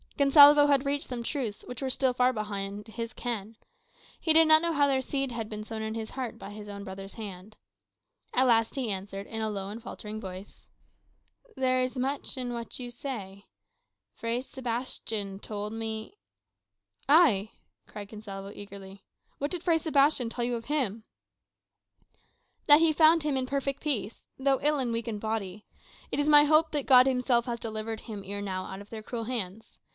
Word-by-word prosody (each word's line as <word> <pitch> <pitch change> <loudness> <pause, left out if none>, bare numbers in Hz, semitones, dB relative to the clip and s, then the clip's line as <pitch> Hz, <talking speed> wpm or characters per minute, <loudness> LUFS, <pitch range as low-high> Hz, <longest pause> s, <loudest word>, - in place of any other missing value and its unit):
Gonsalvo 290 +1 +8
had 280 -1 +3
reached 285 +2 -1
some 245 -2 -4
truths 235 -6 -3
which 250 +1 -7
were 265 - -1
still 260 0 +1
far 250 +1 +3
beyond 205 -2 -4
his 230 +1 -5
ken. 225 -3 -5 0.6
He 320 - +3
did 325 0 +6
not 315 0 +7
know 340 0 0
how 285 -1 +4
their 265 -1 +2
seed 270 0 -2
had 225 -2 -4
been 215 -1 -5
sown 220 0 -5
in 220 0 -3
his 220 -1 -5
heart 255 -4 -5
by 200 - -9
his 210 0 -9
own 200 0 -7
brother's 195 0 -8
hand. 205 -1 -8 0.8
At 260 - +4
length 225 -1 +3
he 255 -6 -1
answered, 195 +1 -5
in 225 +1 -5
a 220 - 0
low 195 -2 -4
and 220 +3 -7
faltering 215 -2 -7
voice, 190 0 -9 0.9
"There 255 -1 +2
is 255 +1 -2
much 270 +2 -2
in 245 -1 -3
what 235 -1 -6
you 245 -1 -6
say. 205 -6 -7 0.7
Fray 230 +2 -2
Sebastian 230 -6 -4
told 210 0 -5
me 220 -1 -5 0.4
" 100 +1 -60
"Ay," 260 - +5 0.4
cried 205 -1 -8
Gonsalvo 200 -2 -8
eagerly, 195 -1 -10 0.4
"what 285 - -1
did 355 0 -4
Fray 335 -2 +3
Sebastian 285 -5 +2
tell 235 +1 -2
you 245 0 -1
of 230 -1 -6
him?" 245 -8 -1 1.6
"That 295 0 +9
he 325 -1 +4
found 320 +1 +5
him 295 -3 0
in 255 -1 -1
perfect 275 0 -2
peace, 240 -8 -1
though 270 0 +2
ill 300 +1 +3
and 250 -4 -1
weak 230 +1 -3
in 220 -2 -3
body. 210 -2 -4 0.5
It - - -1
is 290 +1 +2
my 295 -1 +8
hope 310 +2 +4
that 290 -3 -1
God 255 -1 +7
himself 250 -2 +2
has 235 -2 -3
delivered 220 0 -4
him 210 -4 -7
ere 200 +1 -5
now 185 -2 -3
out 190 +1 -7
of 205 - -14
their 220 -1 -7
cruel 230 +1 -4
hands. 225 -3 -5
230 Hz, 190 wpm, -29 LUFS, 210-270 Hz, 1.6 s, That